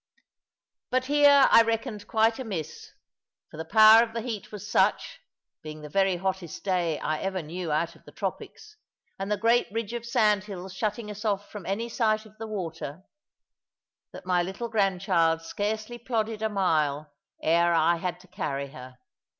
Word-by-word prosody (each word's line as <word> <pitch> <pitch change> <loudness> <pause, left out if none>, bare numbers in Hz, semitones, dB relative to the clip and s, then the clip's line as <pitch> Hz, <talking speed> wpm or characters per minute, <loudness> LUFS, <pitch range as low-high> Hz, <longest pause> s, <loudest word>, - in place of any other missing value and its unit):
But 255 0 +1
here 285 0 +6
I 230 - +9
reckoned 225 -2 -2
quite 225 +1 +2
amiss, 185 - -6 0.6
for - - -11
the 160 - -5
power 220 +5 +8
of 230 -1 -2
the 230 - -1
heat 225 -3 -6
was 210 -1 -8
such - - +1 0.4
being 155 0 -9
the 150 - -9
very 195 +2 +2
hottest 190 -2 -4
day 175 -5 0
I 155 0 -2
ever 190 -2 -3
knew 170 +1 -5
out 155 +3 -1
of - - -22
the - - -13
tropics, 430 0 -6 0.4
and 195 +2 -3
the 210 - +1
great 230 +3 +3
ridge 225 0 -3
of 240 -1 -4
sandhills 200 -4 0
shutting 210 +2 -3
us 210 0 -8
off 205 -2 -2
from 205 -4 -8
any 220 +4 -2
sight 220 -2 0
of 215 0 -17
the 225 - -5
water 170 -5 -6 1.1
that - - -11
my 180 -1 +2
little 190 +7 -4
grandchild 185 -6 +1
scarcely 215 +6 -3
plodded 225 -3 -2
a 220 - 0
mile 155 -7 0 0.3
ere 170 +2 +3
I 170 +1 +3
had 175 0 -4
to 185 - -19
carry 140 -7 -4
her. 130 -1 -12
195 Hz, 170 wpm, -27 LUFS, 170-220 Hz, 1.1 s, I